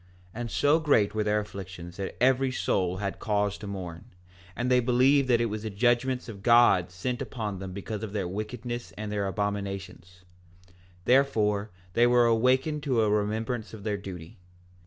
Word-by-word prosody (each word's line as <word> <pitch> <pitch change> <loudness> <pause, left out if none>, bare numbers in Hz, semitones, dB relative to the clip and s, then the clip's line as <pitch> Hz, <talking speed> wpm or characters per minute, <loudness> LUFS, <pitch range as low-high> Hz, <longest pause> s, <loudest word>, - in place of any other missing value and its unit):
4:3 120 - -5
And 120 - -4
so 145 +7 +3
great 140 -10 +3
were 110 0 0
their 105 0 +1
afflictions 95 -4 -9
that 100 -1 -5
every 130 +1 +3
soul 95 -7 0
had 100 0 -4
cause 105 -2 0
to 105 - -7
mourn; 90 -2 -6 0.5
and 125 +1 -1
they 125 - +5
believed 130 +3 +3
that 120 -2 +4
it 120 - +2
was 110 -1 -3
the 110 - -4
judgments 120 +4 +1
of 105 -4 -9
God 115 -6 +5
sent 120 +8 -4
upon 105 -6 -4
them 95 -1 -6
because 100 +2 -5
of 110 -3 -5
their 100 -3 -2
wickedness 120 +5 -5
and 105 0 -5
their 100 -1 -1
abominations; 95 -3 -4 0.8
therefore 110 -6 +2 0.2
they 120 +4 +4
were 120 0 +5
awakened 130 +6 +2
to 130 -6 +1
a 105 - +2
remembrance 110 +2 -1
of 105 - -11
their 105 -1 -1
duty. 95 -1 -9
105 Hz, 180 wpm, -27 LUFS, 100-120 Hz, 0.8 s, they